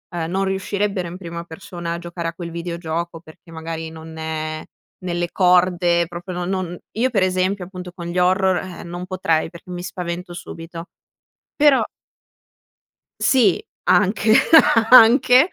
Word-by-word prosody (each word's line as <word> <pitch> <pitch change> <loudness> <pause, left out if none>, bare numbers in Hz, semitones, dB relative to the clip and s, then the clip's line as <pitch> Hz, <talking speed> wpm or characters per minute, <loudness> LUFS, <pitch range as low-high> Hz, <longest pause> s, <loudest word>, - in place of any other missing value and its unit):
uhm, 165 -1 -2
non 195 +1 0
riuscirebbero 195 -1 -2
in 180 - -8
prima 170 -2 -7
persona 170 0 -7
a - - -4
giocare 170 -1 -5
a - - -8
quel 170 0 -7
videogioco, 170 0 -4
perché, 160 +1 -17
magari, 165 0 -6
non 160 0 -10
è 155 0 -4 0.4
nelle 175 -1 -2
corde 180 -2 +3
proprio 175 +2 -7
no 175 - -2
non 185 -2 -3
io, 245 +4 +1
per 200 -6 +1
esempio, 185 +1 0
appunto, 180 -1 -9
con 175 -1 -9
gli 175 +1 -4
horror, 185 +1 +3 0.2
eh, - - -8
non 175 +1 -6
potrei 165 -4 0
perché 170 +2 -14
mi 175 0 -5
spavento 180 -1 -5
subito 165 0 -9 0.7
però 290 -3 +5 1.4
Sì, 230 -9 +3 0.2
anche, 210 +2 +3 0.6
anche 255 +5 +7
175 Hz, 145 wpm, -21 LUFS, 170-190 Hz, 1.4 s, anche